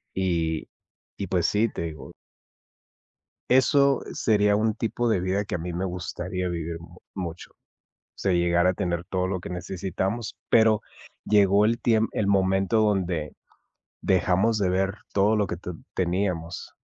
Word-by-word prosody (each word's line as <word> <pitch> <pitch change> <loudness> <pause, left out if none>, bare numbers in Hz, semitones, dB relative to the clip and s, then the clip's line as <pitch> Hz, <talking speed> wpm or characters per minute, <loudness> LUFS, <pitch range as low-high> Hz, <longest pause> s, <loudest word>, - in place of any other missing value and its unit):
Y 85 -4 -1 0.5
y 100 - -3
pues 85 -1 +1
sí, 105 +3 +2
te - - -6
digo 75 -5 -7 1.4
eso 135 +2 +4
sería 105 -2 +2
un 110 +1 +1
tipo 120 +1 -1
de 100 -5 +2
vida 95 +3 0
que - - -3
a - - 0
mí 85 +1 -5
me 90 +3 -2
gustaría 90 0 -4
vivir 85 -1 -4
mu 85 +1 -14 0.2
mucho. 90 -3 -6 0.6
Se 95 - 0
llegara 85 +1 +3
a - - -6
tener 85 -2 -2
todo 90 0 -1
lo 95 0 -2
que - - -8
necesitamos, 95 +5 -3
pero 110 -2 +5 0.4
llegó 100 0 +4
el 115 +2 +1
tiem 115 -1 +2
el 105 - -1
momento 95 +2 +2
donde 90 -7 0 0.7
dejamos 95 +4 +2
de 100 -3 +1
ver 95 +1 +1 0.2
todo 100 +2 +4
lo 105 -1 +2
que 85 - -4
te 90 +1 -7 0.2
teníamos 90 -2 -2
95 Hz, 155 wpm, -25 LUFS, 90-105 Hz, 1.4 s, pero